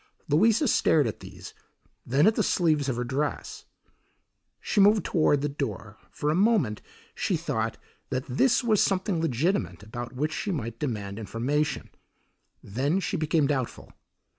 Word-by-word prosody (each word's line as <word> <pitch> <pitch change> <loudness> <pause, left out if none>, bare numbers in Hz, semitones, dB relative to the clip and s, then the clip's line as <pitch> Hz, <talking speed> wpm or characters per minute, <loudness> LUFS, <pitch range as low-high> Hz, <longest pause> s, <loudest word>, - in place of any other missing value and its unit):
Louisa 220 - +3
stared 155 - +3
at 110 - -4
these, 95 -1 -11 0.5
then 135 +6 +3
at 220 - +5
the 220 - 0
sleeves 155 -8 +1
of 130 - -1
her 120 - -2
dress. 140 +4 -3 0.9
She 205 - +1
moved 205 +1 +5
toward 150 -4 +2
the 145 - 0
door. 135 -7 -5
For 150 0 -2
a - - +1
moment 195 - +2 0.3
she 185 - -1
thought 115 -9 -2 0.3
that 130 -1 -2
this 240 - +2
was 220 -4 +3
something 185 -3 +1
legitimate 125 - -1
about 120 +3 -7
which 150 +4 -1
she - - -3
might 115 - -4
demand 105 -6 -3
information; 130 +8 -2 0.7
then 140 - 0
she 195 - -2
became 155 -2 +1
doubtful. 135 -4 -3
145 Hz, 150 wpm, -27 LUFS, 120-175 Hz, 0.9 s, at